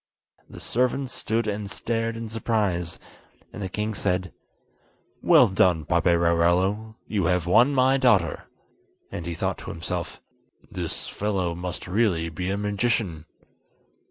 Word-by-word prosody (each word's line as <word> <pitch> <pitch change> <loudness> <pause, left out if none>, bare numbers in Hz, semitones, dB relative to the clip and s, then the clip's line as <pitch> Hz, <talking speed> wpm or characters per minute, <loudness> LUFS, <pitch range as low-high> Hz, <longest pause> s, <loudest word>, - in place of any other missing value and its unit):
The - - -10
servants 125 +2 0
stood 115 +1 -1
and 105 -1 -3
stared 115 +1 -2
in 115 0 -5
surprise, 105 -6 -1 0.6
and - - -7
the 95 - -3
king 105 +3 -2
said: 95 -2 -1 0.9
"Well - - +6
done, 90 -4 +2
Paperarello, 85 +5 +2
you 100 -5 0
have 90 -1 +1
won 120 +11 +4
my 130 +1 +4
daughter." 110 - +2 0.7
And 85 - -5
he 85 - -3
thought - - -2
to - - -8
himself: 85 +1 -4 0.5
"This - - -3
fellow 95 -4 -1
must 90 +1 -5
really 90 -4 +1
be 90 +3 -4
a 100 - -1
magician." 105 -5 -1
95 Hz, 130 wpm, -25 LUFS, 85-110 Hz, 0.9 s, Well